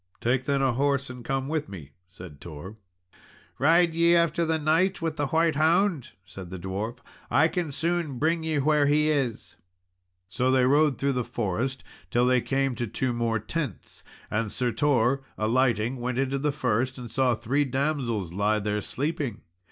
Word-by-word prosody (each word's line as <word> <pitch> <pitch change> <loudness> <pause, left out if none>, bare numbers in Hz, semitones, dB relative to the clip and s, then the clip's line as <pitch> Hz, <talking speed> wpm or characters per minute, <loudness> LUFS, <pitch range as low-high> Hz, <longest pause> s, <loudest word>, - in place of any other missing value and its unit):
"Take 125 +2 0
then 140 0 +1
a 130 -2 +2
horse, 140 +1 0
and 125 -1 -10
come 135 +1 -2
with 155 0 -2
me," 80 -8 -10 0.2
said 90 -5 -12
Tor. 85 +5 -9 0.8
"Ride 165 +4 +4
ye 170 +1 +4
after 170 0 +2
the 160 0 +1
knight 165 +5 +2
with 165 -1 -2
the 145 - 0
white 160 +2 +2
hound?" 165 - +2
said 90 0 -10
the 95 - -6
dwarf; 100 +6 -4 0.3
"I 160 +3 +4
can 170 -4 -3
soon 165 -2 -1
bring 165 +4 +1
ye 160 -1 -1
where 145 0 +3
he 150 +1 +3
is." 135 -7 -2 0.7
So 120 +7 0
they 130 -1 +4
rode 145 0 +3
through 140 0 0
the 125 -1 -1
forest 115 +4 -3 0.3
till 120 +1 +2
they 125 0 +3
came 135 0 0
to 120 - -2
two 125 +4 -1
more 115 -1 0
tents. 130 - -5 0.3
And 105 0 -1
Sir 125 -1 -1
Tor 130 +1 +2 0.2
alighting, 120 +1 +1
went 125 0 -3
into 135 +1 0
the 150 +1 0
first, 130 -1 -1
and 120 -3 -8
saw 130 -2 +2
three 120 +6 0
damsels 130 - -2
lie 105 +3 +1
there, 105 0 -1
sleeping. 140 -2 -3
130 Hz, 175 wpm, -26 LUFS, 115-150 Hz, 0.8 s, Ride